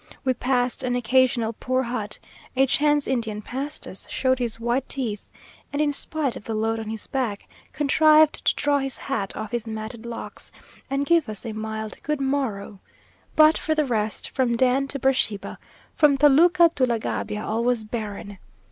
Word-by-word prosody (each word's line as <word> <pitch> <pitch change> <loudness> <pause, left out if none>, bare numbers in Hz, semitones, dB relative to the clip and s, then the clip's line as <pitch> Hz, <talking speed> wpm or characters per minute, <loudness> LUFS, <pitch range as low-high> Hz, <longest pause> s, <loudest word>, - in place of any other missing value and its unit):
We 260 - +3
passed 250 0 0
an 250 -1 -1
occasional 245 -1 +2
poor 255 +3 -1
hut 220 -4 -4 0.4
a 265 +1 +5
chance 295 +2 +2
Indian 220 -5 -2
passed 275 +6 -5
us 190 - -5
showed 260 0 +1
his 230 -2 -3
white 240 +3 -1
teeth, 230 -7 -3 0.4
and, 285 - -3
in 295 -1 +2
spite 290 -3 -2
of - - -8
the 225 - -4
load 225 +1 0
on 220 -1 -5
his 220 -1 -5
back, 245 -7 -3 0.2
contrived 305 +2 +4
to - - +3
draw 290 -1 +2
his 270 -2 -3
hat 225 -8 -3
off 220 0 -5
his 235 -1 -3
matted 220 +1 -6
locks, 235 - -7 0.4
and 275 +1 0
give 335 -5 +3
us 215 +2 -5
a 225 - -4
mild 220 0 -5
good 300 -1 -2
morrow 260 -8 -2 0.6
but 310 +1 +6
for 315 - 0
the 305 -1 +2
rest, 220 -4 -2
from 250 -3 +1
Dan 260 +2 +2
to 275 - -3
Beersheba, 255 -6 0 0.3
from 290 -2 +4
Toluca 330 +4 +6
to 255 -2 +3
La 235 -1 +1
Gabia, 210 -1 -3
all 225 +2 -1
was 245 -2 +1
barren. 205 -3 -6
250 Hz, 180 wpm, -24 LUFS, 220-275 Hz, 0.6 s, but